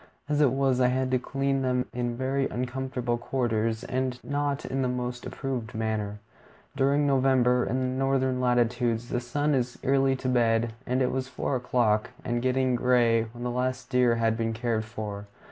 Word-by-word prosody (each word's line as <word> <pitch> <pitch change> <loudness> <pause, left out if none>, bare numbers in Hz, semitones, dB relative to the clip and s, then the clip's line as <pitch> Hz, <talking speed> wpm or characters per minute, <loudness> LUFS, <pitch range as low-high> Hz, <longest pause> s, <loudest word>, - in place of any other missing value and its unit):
As 150 0 +1
it 145 - +6
was, 135 -1 +1
I 125 - +5
had 130 +1 0
to 130 - +3
clean 135 +1 -1
them 125 -1 +1
in 120 -1 -2
very 135 +1 0
uncomfortable 125 -1 -2
quarters 115 -3 -1
and 130 -1 -2
not 145 -1 -2
in 135 +1 -2
the 130 - +1
most 125 0 -3
approved 125 -6 -4
manner. 110 -2 -2 0.6
During 140 +1 +2
November, 130 -2 +3
in 130 - -1
the 130 0 -1
northern 130 -1 +1
latitudes, 120 -1 +1
the 120 - 0
sun 145 +5 0
is 125 -2 -1
early 135 0 +3
to 130 0 -4
bed, 115 -2 +2
and 130 +1 +1
it 125 - +1
was 130 0 -2
four 130 +1 -2
o'clock 120 -4 +1 0.2
and 120 -1 -1
getting 130 0 +1
gray 120 -2 +3
when 120 +2 -9
the 125 - -1
last 125 +1 -2
deer 125 -2 +4
had 115 -1 +1
been 115 0 -1
cared 110 -1 -1
for. 105 -2 -6
125 Hz, 180 wpm, -27 LUFS, 120-130 Hz, 0.6 s, it